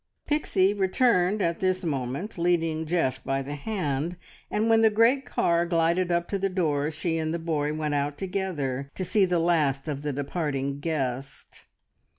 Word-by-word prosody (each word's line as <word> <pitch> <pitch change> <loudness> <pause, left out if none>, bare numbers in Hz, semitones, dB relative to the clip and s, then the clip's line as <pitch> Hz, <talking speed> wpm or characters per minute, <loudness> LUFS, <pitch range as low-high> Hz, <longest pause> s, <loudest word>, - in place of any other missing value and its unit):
Pixie 205 -10 +2
returned 195 -1 +2
at 170 0 0
this 185 0 0
moment, 140 - -3
leading 165 -2 +1
Geoff 140 -6 0
by 135 0 -1
the 140 +2 -6
hand, 155 -1 -2 0.3
and 215 +2 0
when 225 0 +5
the 220 - +6
great 230 +5 +3
car 170 0 +2
glided 170 +1 +1
up 170 0 +1
to 200 - -1
the 195 +1 0
door, 155 -6 0
she 165 +1 -2
and 155 0 -1
the 170 - -1
boy 155 -3 -1
went 155 -1 -2
out 145 0 -1
together 160 -9 -3
to 185 - -3
see 205 0 +3
the 180 -1 +1
last 155 -5 +1
of 145 -2 -3
the 150 0 -2
departing 140 -1 -2
guest. 135 -4 -4
165 Hz, 170 wpm, -26 LUFS, 145-185 Hz, 0.3 s, the